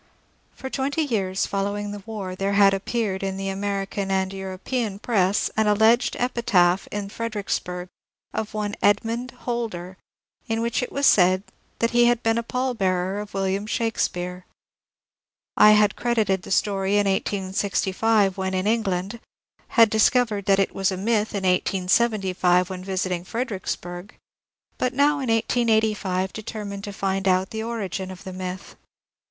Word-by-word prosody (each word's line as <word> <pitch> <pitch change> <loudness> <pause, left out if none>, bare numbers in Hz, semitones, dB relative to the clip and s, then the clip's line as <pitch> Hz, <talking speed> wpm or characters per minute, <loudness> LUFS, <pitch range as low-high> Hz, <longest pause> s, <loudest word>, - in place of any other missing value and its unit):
For 265 - -7
twenty 285 +4 0
years 195 -8 -1
following 205 +1 -2
the 205 0 -7
war 200 -4 -5
there 195 +1 -1
had 200 -1 +6
appeared 195 0 -2
in 195 -1 -3
the 195 0 -3
American 195 0 -3
and 190 0 0
European 195 +3 -3
press 205 -3 +1
an 220 -1 +2
alleged 220 +3 +4
epitaph 195 -7 +2
in 205 -1 -4
Fredericksburg 200 -5 -3 0.5
of 220 -1 -4
one 210 -1 -2
Edmond 230 +4 +1 0.2
Holder, 200 -7 -4 0.5
in 225 0 -1
which 230 0 0
it 250 - -4
was 280 0 0
said 185 -3 +5 0.3
that 230 - +1
he 240 0 +5
had 240 0 +2
been 225 +1 +2
a - - 0
pall 250 +2 -2
bearer 190 -2 0
of 210 -1 -8
William 195 +1 -1
Shake 225 0 -1
speare. 180 +1 -2 1.1
I 215 - +8
had 210 -1 +4
credited 215 -6 +1
the - - -11
story 195 0 +1
in 205 0 +3
1865 195 +1 0
when 190 0 -1
in 185 +1 -1
England, 205 -1 -1 0.5
had 230 -3 +5
discovered 220 -2 +2
that 195 -1 +4
it 195 - +1
was 195 0 0
a 185 - -3
myth 215 +1 0
in 200 - -2
1875, 185 -1 +2
when 185 -1 -6
visiting 185 -2 -2
Fredericksburg, 190 -4 -5 0.6
but 255 0 0
now 290 +1 +3
in 260 -3 -3
1885 220 -5 +1
determined 205 -2 -6
to 205 - -5
find 195 -1 -2
out 185 0 +2
the 220 - -3
origin 200 -5 -4
of 185 -1 -10
the 190 - -7
myth. 185 0 -6
200 Hz, 155 wpm, -24 LUFS, 190-225 Hz, 1.1 s, I